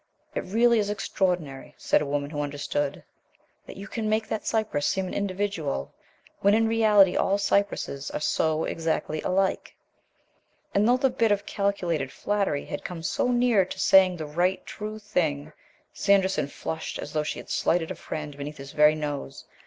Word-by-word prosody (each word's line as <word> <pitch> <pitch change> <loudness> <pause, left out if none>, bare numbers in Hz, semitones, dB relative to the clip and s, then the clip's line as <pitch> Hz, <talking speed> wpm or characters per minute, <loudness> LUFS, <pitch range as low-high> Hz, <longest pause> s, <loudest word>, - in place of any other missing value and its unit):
"It - - -3
really 230 +4 +3
is 205 -1 0
extraordinary," 180 -9 -2
said - - +2
a 150 - -2
Woman 145 0 -2
who 145 -2 -2
Understood, 145 0 -3 0.6
"that - - -10
you 200 +1 -8
can 220 -1 -3
make 220 0 +1
that 220 - -3
cypress 215 -10 0
seem 190 0 0
an - - -6
individual, 190 - -2 0.5
when 200 +1 +4
in 225 0 +3
reality 215 -4 +5
all 195 - +2
cypresses 200 -8 0
are - - -4
so 155 +1 +1
exactly 160 -1 -2
alike." 190 +1 0 1.0
And 205 +2 +3
though 250 - +5
the 265 0 +2
bit 230 -4 +2
of 205 0 +1
calculated 175 -9 -1
flattery 200 -8 -1
had 145 - -6
come 170 -2 -6
so 165 - 0
near 240 -4 +3
to 180 - -7
saying 185 -2 +5
the 155 - -5
right, 175 +5 0
true, 215 0 -6
thing, 155 -8 -2 0.4
Sanderson 190 -7 +2
flushed 160 +2 -5
as 145 - -7
though 155 - +1
she 150 - -3
had - - -9
slighted 165 -1 +1
a - - -4
friend 150 -2 -6
beneath 145 +1 -7
his 140 0 -9
very 150 0 +5
nose. 145 - -5
185 Hz, 175 wpm, -26 LUFS, 150-205 Hz, 1.0 s, reality